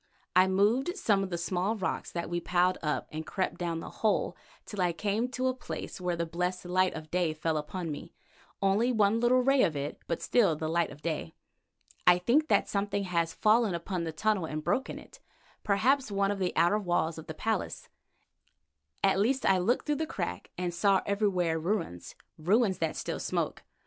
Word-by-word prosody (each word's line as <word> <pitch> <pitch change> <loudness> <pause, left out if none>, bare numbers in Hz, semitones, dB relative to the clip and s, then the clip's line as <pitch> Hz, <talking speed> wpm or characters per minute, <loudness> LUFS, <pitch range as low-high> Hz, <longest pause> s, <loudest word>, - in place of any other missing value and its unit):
I 185 +1 +6
moved 225 - +2
some 205 - +2
of 195 - -2
the 175 - -2
small 180 +5 -1
rocks 190 -4 -3
that 170 -1 -3
we 175 +1 -1
piled 180 +1 +2
up, 150 -1 -1
and 155 +1 -4
crept 185 +3 -2
down 170 -2 -2
the - - -8
hole 215 -2 +1 0.3
till 205 -3 -4
I 175 -1 +2
came 210 +6 -1
to 255 0 -3
a 260 - +2
place 250 -6 -7
where 180 -1 0
the 170 0 -1
blessed 180 +2 -2
light 185 +1 +2
of 155 -1 -8
day 175 -3 +1
fell 160 +1 -1
upon 160 +2 -3
me, 145 - -7 0.5
only 205 +6 +3
one 220 -1 +3
little 250 +2 +4
ray 270 0 +4
of 155 - +2
it, 145 +1 -4
but 170 - -1
still 200 -10 +3
the 155 +1 -3
light 170 +1 +1
of 145 +1 -13
day. 160 0 -3 0.7
I 180 0 +8
think 250 +12 +2
that - - +3
something 200 0 -1
has 170 -3 0
fallen 215 0 +3
upon 170 +1 -3
the 165 - -3
tunnel 200 +2 0
and 155 -1 -4
broken 265 - -1
it, - - -14 0.4
perhaps 250 +6 +2
one 200 0 +1
of 205 - -3
the 185 -2 0
outer 175 +6 +3
walls 175 -4 0
of 160 - -11
the 160 - -6
palace. 220 +2 -2 1.2
At 195 -1 +4
least 260 +6 +1
I 190 -1 +4
looked 230 +8 +1
through 295 -1 0
a 320 - -1
crack 90 - -4
and 180 -1 -2
saw 195 +2 +3
everywhere 185 -5 +1
ruins—ruins 185 - -1
that 160 -1 -1
still - - -3
smoke. - - -2
185 Hz, 195 wpm, -30 LUFS, 170-215 Hz, 1.2 s, I